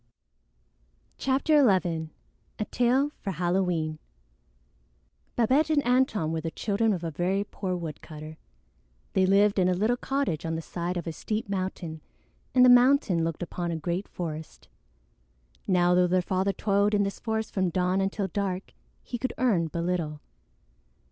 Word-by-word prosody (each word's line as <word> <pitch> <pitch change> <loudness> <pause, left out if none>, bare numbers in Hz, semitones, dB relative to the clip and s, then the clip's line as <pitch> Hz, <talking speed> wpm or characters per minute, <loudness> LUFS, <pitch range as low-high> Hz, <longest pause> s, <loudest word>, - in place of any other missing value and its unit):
CHAPTER 275 +3 +3 0.2
XI 160 -2 -4 0.5
A 215 - -2
TALE 255 +4 +2
FOR 195 - -3
HALLOWEEN 175 -3 0 1.4
Babette 265 +7 +3
and 295 -2 +2
Antone 245 - +2
were 160 -1 -2
the 165 - -3
children 220 +5 0
of 180 -4 -2
a 165 - -3
very 185 +6 0
poor 190 -2 -4
woodcutter. 155 -2 -8 0.7
They 190 -1 +3
lived 200 +1 +4
in 180 - +3
a 180 - +2
little 220 +6 +1
cottage 270 - -1
on 165 0 -2
the 160 - -3
side 175 +3 -3
of 175 - -4
a 165 - -3
steep 215 +6 -3
mountain, 185 -5 -4 0.5
and 250 0 +7
the - - +7
mountain 245 - +5
looked 165 0 -2
upon 175 0 -4
a 170 - -2
great 175 +4 -3
forest. 155 - -7 1.0
Now 180 -2 +3
though 180 0 +4
their 180 0 +2
father 190 +2 0
toiled 200 +1 +1
in 205 - +3
this 200 0 -3
forest 220 -1 -3
from 185 -2 +1
dawn 180 +2 +1
until 195 +1 -1
dark, 190 0 -3 0.3
he 240 - -5
could 255 0 -2
earn 210 -10 +2
but 170 +2 -3
little. 170 -4 -2
185 Hz, 155 wpm, -27 LUFS, 170-215 Hz, 1.4 s, and